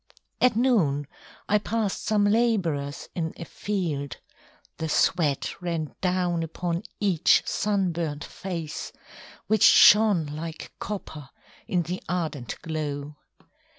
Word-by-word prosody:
At 250 -3 +4
noon 195 - +2 0.4
I 210 - +3
passed 215 -1 -2
some 210 -1 +2
labourers 190 -11 +1
in 160 -2 -3
a 170 - -6
field. 155 -12 -3 0.6
The 160 - -3
sweat 155 0 +1
ran 165 -4 -3
down 180 -2 +1
upon 170 +1 -3 0.2
each 190 -6 +3
sunburnt 170 -7 -1
face, 170 -5 -6 0.5
Which 220 0 +1
shone 210 -6 +7
like 155 +2 -7
copper 160 -9 -6 0.4
in 180 -2 +1
the 180 +3 -4
ardent 155 -9 -3
glow. 150 -2 -4
170 Hz, 110 wpm, -26 LUFS, 155-205 Hz, 0.6 s, shone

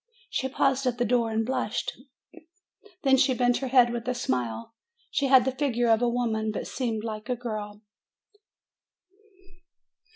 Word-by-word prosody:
She 265 - -1
paused 270 0 +1
at 240 -1 0
the 245 - +1
door 235 0 +2
and 220 0 0
blushed; 260 +3 -2 1.1
then 265 -1 +5
she 260 -1 +3
bent 245 -1 +2
her 270 - -3
head 245 -2 +4
with 235 0 -5
a 250 - 0
smile. 120 - -3 0.4
She 280 -1 +1
had 260 -2 +6
the 265 - +1
figure 250 -3 0
of 225 +1 +3
a 245 - +2
woman, 225 -3 -1
but - - -4
seemed 225 -4 -3
like 215 +1 -6
a 250 - +1
girl. 215 -3 -6
240 Hz, 160 wpm, -27 LUFS, 220-260 Hz, 1.1 s, had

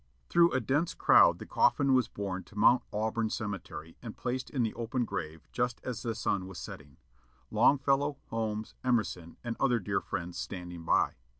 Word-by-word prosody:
Through 170 0 +5
a 130 - +3
dense 145 +6 0
crowd - - +6
the - - -8
coffin 140 -2 +3
was 130 -3 +3
borne 95 -2 -4
to 105 - -15
Mount 120 +4 +6
Auburn 110 +1 -1
cemetery, 100 -7 -5
and 115 -3 -8
placed 125 +1 -3
in 130 -4 0
the 110 - -1
open 120 +1 -2
grave 80 -5 -5
just 120 0 -1
as 125 -3 -4
the 115 -2 -2
sun 100 -4 -1
was 95 -2 -9
setting, 70 -3 -9 0.5
Longfellow, 140 +1 +3
Holmes, 110 -1 -2
Emerson, 105 -9 -1
and 120 -1 -3
other 125 -3 +3
dear 105 - -1
friends 85 0 -5
standing 90 -3 -6
by. - - +2
115 Hz, 175 wpm, -30 LUFS, 95-125 Hz, 0.5 s, crowd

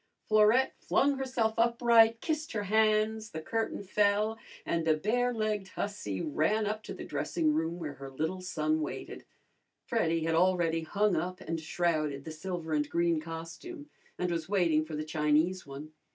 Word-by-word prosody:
Florette 215 +4 +4
flung 280 0 +2
herself 250 -4 0
upright, 230 -1 +5
kissed 310 -1 -2
her 210 -2 -1
hands, 215 +1 +2
the 160 - -6
curtain 225 +5 -2
fell, 205 +2 +2 0.3
and 170 -1 0
the 160 -1 +3
barelegged 215 +1 0
hussy 190 - -4
ran 205 +9 +1
up 215 +1 -2
to - - -9
the - - -6
dressing 315 -3 0
room 165 - -1
where 155 -4 -5
her 135 0 -9
little 160 +7 -3
son 155 -4 0
waited. 150 - -6 0.6
Freddy 165 0 0
had 165 0 0
already 170 -1 +2
hung 200 +4 +1
up 180 +3 -2
and 165 -3 -4
shrouded 155 -4 -1
the 160 - -6
silver 160 0 -4
and 150 -1 0
green 170 -1 +1
costume, 165 - -8 0.3
and 180 -1 -1
was 165 0 -3
waiting 170 -6 +3
for 155 0 -6
the 155 0 -3
Chinese 155 +3 +1
one. 140 +3 -8
180 Hz, 165 wpm, -30 LUFS, 160-215 Hz, 0.6 s, upright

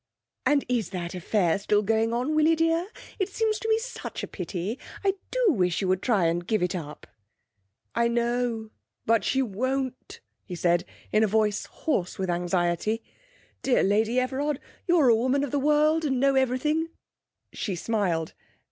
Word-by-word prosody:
'And 280 +1 +3
is 235 -6 0
that 175 -2 -5
affair 180 0 +1
still 210 +1 +2
going 225 +2 +1
on, 250 +6 0
Willie 310 +1 +4
dear? 330 +2 +1 0.3
It 385 0 0
seems 435 +2 0
to 450 - -3
me 440 - +4
such 465 0 -6
a - - -3
pity. 185 +5 -4 0.2
I 390 -1 +3 0.2
do - - +3
wish 180 -6 +1
you 195 - -1
would 185 0 +1
try 210 -8 +2
and 170 +1 0
give 215 -4 +1
it 180 - 0
up.' 150 -5 -6 0.9
'I 235 0 +2
know, 235 -1 -1 0.4
but 230 0 +3
she 270 +1 +1
won't,' 260 +4 -3 0.2
he 180 - -7
said 175 0 +2 0.3
in 215 - +4
a - - +4
voice 210 0 +1
hoarse 190 - -2
with 190 -2 -1
anxiety. 175 +5 0 0.6
'Dear 260 - +3
Lady 220 +5 +2
Everard, 270 +3 -1 0.3
you're 335 -7 +5
a 230 - +6
woman 260 +5 +1
of 285 - -3
the 285 - +1
world, 300 +3 +3
and 265 -4 0
know 275 +1 +4
everything 270 +5 +1 0.3
' - - -53
She 195 - -3
smiled. 175 -5 -1
235 Hz, 175 wpm, -26 LUFS, 190-285 Hz, 0.9 s, a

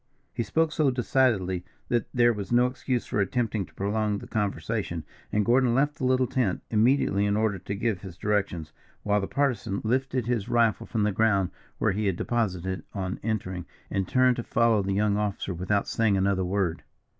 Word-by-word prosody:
He 120 - -2
spoke 160 +8 +1
so 155 -3 +2
decidedly 120 -8 +1 0.3
that 120 -2 +1
there 120 -1 +4
was 105 0 -6
no 120 +1 +5
excuse 125 -1 -2
for 105 - 0
attempting 110 -2 -1
to 80 - -22
prolong 105 +1 0
the - - -8
conversation, 105 -4 -2 0.3
and 105 -1 +1
Gordon 120 0 +3
left 145 +3 +1
the 130 - -2
little 130 0 +3
tent 120 -7 -1
immediately 110 -2 +3
in 100 0 +1
order 110 -3 +1
to 100 +3 -5
give 105 -3 -1
his 90 -3 -9
directions, 95 -6 -1 0.3
while 105 0 +2
the 95 - -3
Partisan 125 -8 0
lifted 130 +1 0
his 115 -4 -1
rifle 115 -3 +2
from 110 -3 0
the 105 - +2
ground 100 -3 +2 0.3
where 105 - +2
he 105 +2 -1
had 95 - +1
deposited 95 -5 -1
it - - -17
on 95 -1 -3
entering, 95 -5 -3 0.2
and 95 -1 -1
turned 130 -2 +3
to 120 - -3
follow 115 -3 +3
the 95 0 -1
young 105 +1 +2
officer 100 -2 -2
without 95 +4 0
saying 110 -3 +2
another 95 0 +1
word. 90 -2 -1
105 Hz, 190 wpm, -27 LUFS, 95-120 Hz, 0.3 s, no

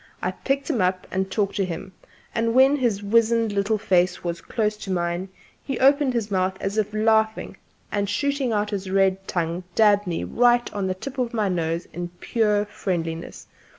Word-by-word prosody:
I - - -1
picked 275 0 -2
him 255 - 0
up 185 0 0
and 190 0 -1
talked 200 -1 -1
to 200 - +2
him; 185 +1 -5 0.4
and 230 0 0
when 265 +2 +6
his 225 -6 0
wizened 230 +1 +3
little 205 +2 +1
face 180 -2 +1
was 170 -1 -3
close 215 -3 -1
to 195 - -6
mine, 175 +1 -1 0.3
he 270 -3 -3
opened 275 -1 +4
his 220 -3 -2
mouth 190 0 0
as 200 +2 -1
if 210 -1 -1
laughing, 220 0 +1 0.3
and 200 -1 -1
shooting 280 +3 0
out 210 0 0
his 195 -2 -3
red 195 0 +1
tongue 170 +1 -2
dabbed 205 -2 +4
me 170 -2 -2
right 240 0 +2
on 200 -2 -2
the 185 - -1
tip 265 +8 -7
of 240 -1 -1
my 210 -3 +1
nose 165 -1 -1
in 175 0 -4
pure 210 -3 +1
friendliness. 170 -5 -4
205 Hz, 185 wpm, -24 LUFS, 185-230 Hz, 0.4 s, when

